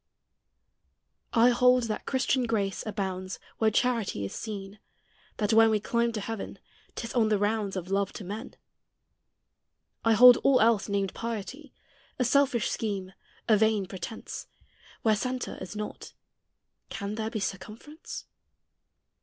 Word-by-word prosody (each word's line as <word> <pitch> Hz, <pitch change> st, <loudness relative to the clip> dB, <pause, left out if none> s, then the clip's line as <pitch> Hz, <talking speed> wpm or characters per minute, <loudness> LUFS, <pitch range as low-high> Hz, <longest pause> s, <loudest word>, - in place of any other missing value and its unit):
I 235 Hz, +1 st, +6 dB
hold 250 Hz, +1 st, +4 dB
that 220 Hz, -2 st, -4 dB
Christian 260 Hz, -1 st, +1 dB
grace 200 Hz, -4 st, -1 dB
abounds 190 Hz, -3 st, -3 dB, 0.2 s
Where 220 Hz, -, +4 dB
charity 225 Hz, -, 0 dB
is 95 Hz, -, -6 dB
seen; 205 Hz, -2 st, -6 dB, 0.6 s
that 210 Hz, +1 st, +1 dB
when 225 Hz, 0 st, +7 dB
We 215 Hz, -1 st, +2 dB
climb 235 Hz, +2 st, 0 dB
to 215 Hz, -, -3 dB
heaven, 225 Hz, 0 st, -5 dB, 0.4 s
't -, -, -4 dB
is 230 Hz, -, -6 dB
on 225 Hz, -3 st, +3 dB
the 210 Hz, -, +3 dB
rounds 205 Hz, -1 st, 0 dB
Of 185 Hz, 0 st, -5 dB
love 200 Hz, 0 st, +1 dB
to -, -, -7 dB
men. 210 Hz, +7 st, -7 dB, 1.5 s
I 225 Hz, -, +4 dB
hold 245 Hz, +2 st, +9 dB
all 275 Hz, -2 st, +4 dB
else, 225 Hz, -2 st, +3 dB
named 200 Hz, -1 st, -1 dB
piety, 235 Hz, +6 st, -5 dB, 0.5 s
A 250 Hz, -, +1 dB
selfish 255 Hz, -3 st, +3 dB
scheme, 195 Hz, -4 st, -3 dB, 0.3 s
a 220 Hz, -, +6 dB
vain 215 Hz, -1 st, +2 dB
pretence; 190 Hz, +3 st, -7 dB, 0.6 s
Where 220 Hz, -1 st, +4 dB
centre 255 Hz, +3 st, -3 dB
is 185 Hz, +3 st, -7 dB
not 210 Hz, 0 st, -6 dB, 0.8 s
can 200 Hz, +1 st, -4 dB
there 220 Hz, 0 st, -3 dB
be 225 Hz, -, -3 dB
Circumference? 215 Hz, -, -6 dB
220 Hz, 140 wpm, -28 LUFS, 200-235 Hz, 1.5 s, hold